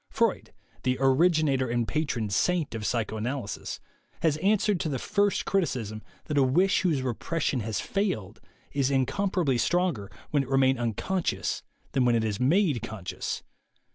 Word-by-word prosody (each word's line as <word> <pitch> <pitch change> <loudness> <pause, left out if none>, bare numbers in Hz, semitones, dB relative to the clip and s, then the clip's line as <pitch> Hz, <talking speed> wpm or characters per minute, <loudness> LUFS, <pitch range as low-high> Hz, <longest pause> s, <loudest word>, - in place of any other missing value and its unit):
Freud, - - 0 0.3
the 125 0 0
originator 135 -1 +3
and 120 -1 0
patron 135 -8 -1
saint 160 - +1
of 110 -3 -3
psychoanalysis, 115 0 -3 0.4
has 160 -3 +3
answered 200 +2 +2
to 160 - -1
the 135 - -1
first 205 - +1
criticism 125 - -1 0.2
that 150 -2 +1
a - - +5
wish 175 +9 +3
whose 155 -8 +1
repression 130 +3 -1
has 110 -1 -2
failed 110 - -2 0.3
is 140 -2 +1
incom 140 +9 +1
parably 145 -11 +1
stronger 155 - +1 0.2
when 145 - +3
it 135 - -6
remain 135 -1 +3
unconscious 120 - -1 0.3
than 135 -2 +2
when 120 -1 +4
it 115 - +2
is 110 -1 -2
made 145 - +3
conscious. 110 -5 -5
135 Hz, 150 wpm, -27 LUFS, 115-170 Hz, 0.4 s, a